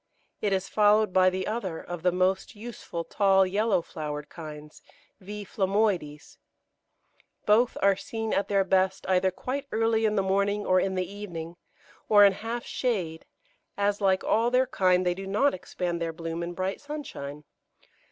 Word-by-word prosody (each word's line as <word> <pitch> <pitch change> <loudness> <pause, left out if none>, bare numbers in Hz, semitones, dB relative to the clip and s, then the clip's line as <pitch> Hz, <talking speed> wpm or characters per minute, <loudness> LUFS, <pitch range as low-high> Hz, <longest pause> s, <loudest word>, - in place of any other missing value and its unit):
It 205 - 0
is 190 0 0
followed 210 -1 +3
by 185 0 +5
the 185 0 -3
other 205 -7 -3
of 175 -1 -7
the 180 +1 +3
most 185 +3 0
useful 210 -6 -6
tall, 195 +1 +3
yellow 200 -1 +1
flowered 150 -3 -6
kinds, 150 -2 -10 0.4
V. 205 +2 -7
phlomoides. 190 -7 -1 1.1
Both 230 +4 +3
are 200 0 +5
seen 225 -2 -4
at 200 - +1
their 200 -1 +2
best 190 0 +1
either 190 0 +3
quite 260 +9 -5
early 225 0 +2
in 210 - 0
the 195 - +2
morning, 200 +2 0
or 185 0 +4
in 190 0 -1
the 185 0 0
evening, 175 -5 -7 0.5
or 205 -1 +8
in 200 - +5
half 230 +4 -5
shade, 180 -11 -2 0.5
as, 205 0 0
like 190 -1 +2
all 230 +2 +2
their 255 +1 +3
kind, 185 -5 +2
they 180 - +2
do 195 +2 -7
not 240 +9 +2
expand 175 -1 -4
their 165 -1 -1
bloom 165 0 -5
in 170 +1 -4
bright 185 +2 -3
sunshine. 200 - -7
195 Hz, 165 wpm, -27 LUFS, 180-210 Hz, 1.1 s, or